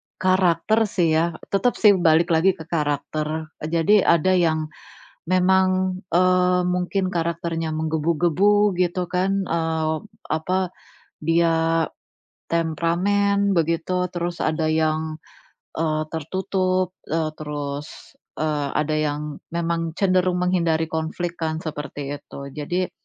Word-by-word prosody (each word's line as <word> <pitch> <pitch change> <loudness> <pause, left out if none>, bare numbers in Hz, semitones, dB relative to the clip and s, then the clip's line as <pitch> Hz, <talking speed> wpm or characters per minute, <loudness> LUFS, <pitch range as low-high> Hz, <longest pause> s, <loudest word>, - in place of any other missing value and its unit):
karakter 185 +2 +2
sih 175 -5 +1
ya. 165 +1 +1 0.2
Tetap 240 +5 +2
sih 210 - +6
balik 170 0 +4
lagi 175 +3 +3
ke 160 - -9
karakter. 155 0 -2 0.2
Jadi 170 +6 +4
ada 175 0 +3
yang 160 -4 +1 0.6
memang, 185 0 +2
eee, 180 +1 +3
mungkin 180 +1 -1
karakternya 165 -1 -2
menggebu-gebu, 170 +6 +2
gitu 180 0 0
kan. 190 +2 0
Eee, 160 -2 -1 0.2
apa, 180 +4 -1 0.5
dia 165 0 +2 0.6
temperamen, 190 +5 +1
begitu. 170 +2 0
Terus 175 0 -3
ada 155 0 0
yang, 155 0 0 0.6
eee, 155 -1 0
tertutup, 185 +2 -1
eee, 160 0 -1
terus, 145 -1 -6 0.2
eee, 150 -2 -1
ada 150 +1 0
yang 150 -1 -2 0.2
memang 165 -1 -1
cenderung 185 -2 +2
menghindari 165 -3 +1
konflik 165 +2 -3
kan, 160 0 -2
seperti 145 -2 -5
itu. 140 0 -10
Jadi 175 +6 -2
170 Hz, 110 wpm, -23 LUFS, 155-185 Hz, 0.6 s, sih